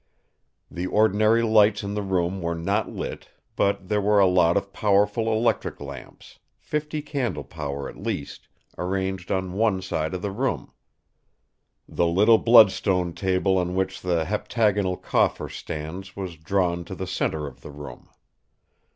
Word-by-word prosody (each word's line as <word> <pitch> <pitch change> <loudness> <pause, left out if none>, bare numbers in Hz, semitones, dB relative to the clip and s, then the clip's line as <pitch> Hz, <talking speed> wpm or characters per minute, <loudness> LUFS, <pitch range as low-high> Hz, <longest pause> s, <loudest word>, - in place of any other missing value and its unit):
The 90 +1 -3
ordinary 110 +3 +3
lights 110 -1 +4
in 100 0 -4
the 105 - -2
room 95 -1 -1
were 85 0 -2
not 100 +6 -1
lit, - - -6 0.3
but 100 -1 0
there 105 0 +1
were 105 +1 +3
a 100 - +6
lot 90 -1 +4
of 100 0 -3
powerful 105 +2 +2
electric 110 +2 0
lamps, - - -11 0.2
fifty 150 0 -4
candle 140 -5 -3
power 70 -4 -5
at - - -11
least, 70 - -5 0.3
arranged 95 0 -2
on 95 -1 -1
one 105 -1 +1
side 80 -3 -3
of 90 - -6
the 100 - -2
room. 125 +6 -2 1.2
The 85 - 0
little 105 +7 +5
bloodstone 95 -6 +5
table 95 0 +1
on 90 0 -2
which 95 0 -2
the 85 -3 0
heptagonal 105 -1 0
coffer - - +1
stands 90 +5 -7
was 95 -4 -5
drawn 85 +1 -1
to 95 - -7
the 95 - -4
centre 80 -4 -2
of 70 -3 -10
the - - -10
room. 70 -4 -10
95 Hz, 150 wpm, -24 LUFS, 90-105 Hz, 1.2 s, a